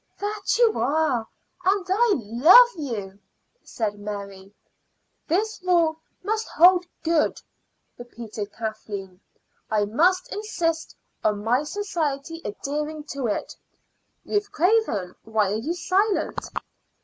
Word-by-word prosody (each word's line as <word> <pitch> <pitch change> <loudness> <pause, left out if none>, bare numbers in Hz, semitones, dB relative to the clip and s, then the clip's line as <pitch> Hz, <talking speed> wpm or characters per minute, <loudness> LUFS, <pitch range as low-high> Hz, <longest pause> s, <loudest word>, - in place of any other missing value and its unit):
"That 410 0 -1
you 470 -2 +3
are, 275 -5 +1 0.4
and 385 0 +2
I 425 +4 +3
love 275 - +7
you," 210 - -5 0.4
said 210 -3 -3
Mary. 200 -2 -7 0.8
"This 420 +5 0
rule 340 -3 +2 0.2
must 435 +1 -1
hold 355 +1 +5 0.2
good," 330 -2 +1 0.6
repeated 230 -4 -7
Kathleen. 205 -4 -6 0.5
"I 210 -1 +2
must 355 - +2
insist 340 -6 -2 0.3
on 210 -1 0
my 245 +4 +2
society 325 -3 -3
adhering 300 +8 -4
to 275 -3 -2
it. 210 - -3 0.7
Ruth 410 0 -1
Craven, 350 - +1
why 220 -3 0
are 210 - 0
you 300 +10 -3
silent?" 385 +4 0
300 Hz, 110 wpm, -24 LUFS, -, 0.8 s, love